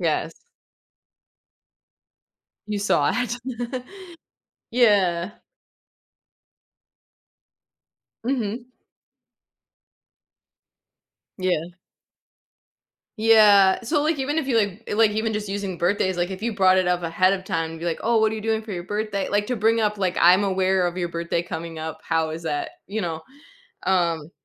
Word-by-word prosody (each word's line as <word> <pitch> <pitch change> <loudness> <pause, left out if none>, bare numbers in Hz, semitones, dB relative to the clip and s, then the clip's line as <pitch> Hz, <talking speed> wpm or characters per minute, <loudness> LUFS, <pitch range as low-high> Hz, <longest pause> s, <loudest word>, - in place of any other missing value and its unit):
Yes. - - 0 2.4
You 210 -1 -2
saw 150 -7 +2
it. 245 +1 -4 0.9
Yeah. 200 -6 +3 2.9
Mhm. 240 -1 -2 2.7
Yeah. 180 -3 -1 1.5
Yeah, 210 -3 +6
so, 290 +5 0
like, 310 -1 0
even 285 +3 -1
if 320 - 0
you, 255 - +1
like, 205 -1 -1
like, 220 +1 +4
even 220 +1 -1
just 210 -1 -4
using 195 -3 -4
birthdays, 185 0 +1
like, 175 +1 0
if 190 +2 -7
you 235 -1 -1
brought 190 -2 +4
it 185 -1 +2
up 180 0 +1
ahead 175 +3 +2
of 190 -1 -4
time, 165 -4 -2
and 165 - -9
be, 170 - -6
like, 170 -2 -2
"Oh, 230 0 +3
what 220 0 +3
are - - -3
you 215 - -5
doing 220 0 0
for 220 -1 -9
your 175 -2 -4
birthday?" 205 0 -3
like, 205 0 0
to 250 - -1
bring 225 +1 +2
up, 210 -1 0
like, 185 -2 -1
"I'm 180 +4 +6
aware 190 -1 +1
of 175 +1 -3
your 175 -1 -2
birthday 170 0 -2
coming 165 -2 -6
up, 160 0 -6
how 160 -1 0
is 160 +1 -6
that?" 150 -3 -3
you 215 +2 -3
know. 165 -3 -3 0.6
Um, 170 -4 0
195 Hz, 140 wpm, -23 LUFS, 175-220 Hz, 2.9 s, Yeah